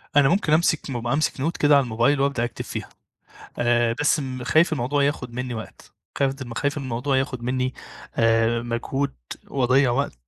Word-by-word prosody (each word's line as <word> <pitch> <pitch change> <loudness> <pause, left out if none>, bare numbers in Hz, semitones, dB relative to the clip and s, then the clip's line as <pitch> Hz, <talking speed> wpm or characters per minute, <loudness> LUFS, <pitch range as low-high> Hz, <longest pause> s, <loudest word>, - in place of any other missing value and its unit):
أنا 140 -2 +6
ممكن 175 -5 +2
أمسك 160 -1 +3
أمسك 125 +4 0
note 160 +6 -2
كده 145 0 +5
على 140 - +5
الموبايل 120 +4 +1
وأبدأ 140 -3 +1
أكتب 120 - -6
فيها - - -6 0.7
آآ، 120 -1 +2
بس 150 +1 +2 0.2
خايف 160 +6 +3
الموضوع 140 +2 0
ياخد 135 -4 -2
مني 125 0 -4
وقت 110 -1 -9 0.3
خايف 135 -1 +1 0.2
خايف 145 +3 -1
إن 140 - -4
الموضوع 130 +2 -1
ياخد 130 -2 -2
مني 130 +1 -1 0.4
آآ، 115 +1 +3
مجهود 120 +4 -2 0.3
وأضيع 130 0 +2
وقت 140 +4 -1
130 Hz, 165 wpm, -23 LUFS, 120-145 Hz, 0.7 s, أنا